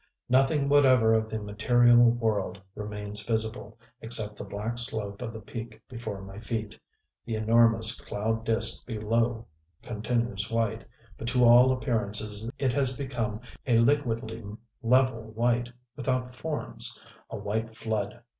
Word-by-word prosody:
Nothing 135 +3 +3
whatever 130 -6 +5
of 110 0 +1
the 110 - -3
material 120 +4 +3
world 110 -5 -1
remains 105 0 -5
visible, 110 0 -3 0.2
except 110 -2 +2
the - - -7
black 110 +4 -4
slope 105 -4 -3
of 115 - -4
the 110 - -8
peak 115 0 -8
before 110 -5 -6
my 95 +1 -9
feet. 110 -2 -5 0.4
The 115 - -4
enormous 115 0 +3
cloud 110 +2 -2
disk 115 0 +1
below 115 +1 -1 0.4
continues 115 -2 -2
white; 115 -1 -1 0.3
but 115 - -5
to 125 0 +3
all 120 +2 +7
appearance 110 -4 0
it 130 -3 0
has 130 -1 +1
become 120 -6 -3 0.3
a 120 -2 +4
liquidly 115 -3 +1 0.4
level 125 0 +3
white, 120 +1 0 0.2
without 130 -2 -2
forms, 150 +4 -1 0.3
a - - -5
white 110 +2 -3
flood. 110 +1 -3
115 Hz, 135 wpm, -28 LUFS, 110-120 Hz, 0.4 s, all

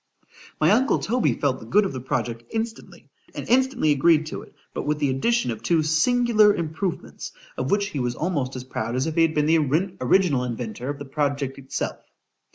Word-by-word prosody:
My - - +4
uncle 265 +2 +3
Toby 245 +1 0
felt 135 -2 0
the - - -11
good 205 - +4
of 190 - -3
the 130 - -4
project 120 -2 -3
instantly, 225 0 -6 0.2
and - - -6
instantly 255 - +2
agreed 155 +2 +4
to 155 - -6
it, - - -16 0.2
but - - -4
with 150 0 +1
the 145 -2 +1
addition 230 - +1
of 110 -1 -6
two 160 +7 +2
singular 215 +6 +4
improvements, 170 +3 -4 0.2
of 130 +1 -3
which 200 0 +1
he 150 - -4
was 125 -1 -1
almost 145 -6 -2
as 125 - -5
proud 115 -2 -4
as 130 - 0
if 160 - -2
he 165 - +2
had 165 -1 +2
been 150 -1 +2
the 160 +1 +4 0.4
original 140 -1 +3
inventor 120 0 -5
of 145 - -3
the 145 - -8
project 140 -1 -2
itself. 135 -1 -4
150 Hz, 200 wpm, -24 LUFS, 130-195 Hz, 0.4 s, My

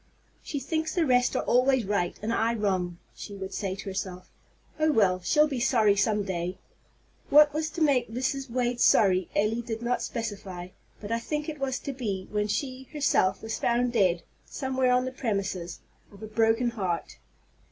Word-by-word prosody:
"She 290 - -4
thinks 315 +3 -2
the 340 -3 +2
rest 250 -2 +3
are - - 0
always 255 -1 +3
right, 190 -3 -1
and 225 +2 -1
I 230 +1 +1
wrong," 185 -5 -1 0.2
she 205 - -8
would 190 0 -6
say 195 -3 -2
to 200 - -8
herself. 190 -2 -5 0.5
"Oh, 310 0 +3
well! 190 -8 +3
she'll 300 +11 +4
be 270 -4 -3
sorry 225 -5 +3
some 210 0 +1
day." 180 -1 -3 0.7
What 295 0 +7
was 310 +1 -1
to 330 - -6
make 265 -6 +3
Mrs. 260 +3 -2
Wade 245 0 -1
sorry 185 -3 +4
Elly 215 +3 +1
did 230 -1 -5
not 245 +1 0
specify; 195 -6 -5 0.3
but 205 +1 -7
I 230 - +1
think 300 +5 -3
it 305 -2 -5
was 270 -2 -1
to 280 - -4
be 205 -8 -4
when 210 0 0
she, 260 +3 -3
herself, 275 -11 +1
was 220 0 -3
found 240 +1 +1
dead, 185 -6 +2 0.2
somewhere 260 -2 -1
on 250 0 +3
the 255 - -3
premises, 195 -8 -3 0.3
of 205 +1 -13
a - - -5
broken 225 +2 +2
heart! 185 -7 -3
230 Hz, 185 wpm, -27 LUFS, 195-260 Hz, 0.7 s, What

